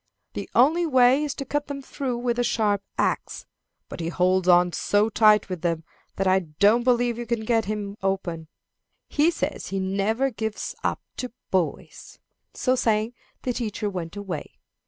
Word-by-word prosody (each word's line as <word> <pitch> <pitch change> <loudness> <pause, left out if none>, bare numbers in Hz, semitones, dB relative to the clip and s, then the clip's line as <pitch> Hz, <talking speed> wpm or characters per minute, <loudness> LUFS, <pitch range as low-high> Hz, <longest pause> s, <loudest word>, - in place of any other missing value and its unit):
The - - -5
only 320 +8 +4
way 260 0 +5
is 295 -2 -3
to 275 - -5
cut 290 +2 -2
them 285 -1 -5
through 260 -3 -3
with 240 0 -1
a - - +3
sharp 210 -4 +1 0.2
axe. - - -1 0.4
But - - -8
he 165 0 -2
holds 185 +1 +2
on 175 -1 +5
so 205 +2 +2
tight 215 -1 +5
with 185 -4 -5
them 165 -2 -1 0.3
that 195 - -1
I 190 0 +4
don't 200 +8 +3
believe 240 -1 +2
you 240 - -5
can 230 -2 -1
get 225 -1 +2
him 205 -1 -4
open. 185 -4 -2 0.6
He 305 +3 +3
says 345 - -3
he 195 - -2
never 200 +8 0
gives 220 -2 -4
up - - -1
to 250 - -4 0.2
boys." 185 -4 -2 0.4
So 255 0 +1
saying, 220 -1 +1 0.3
the 250 - -1
teacher 215 -3 -3
went 175 -1 -5
away. 185 -7 -6
215 Hz, 175 wpm, -25 LUFS, 190-245 Hz, 0.6 s, way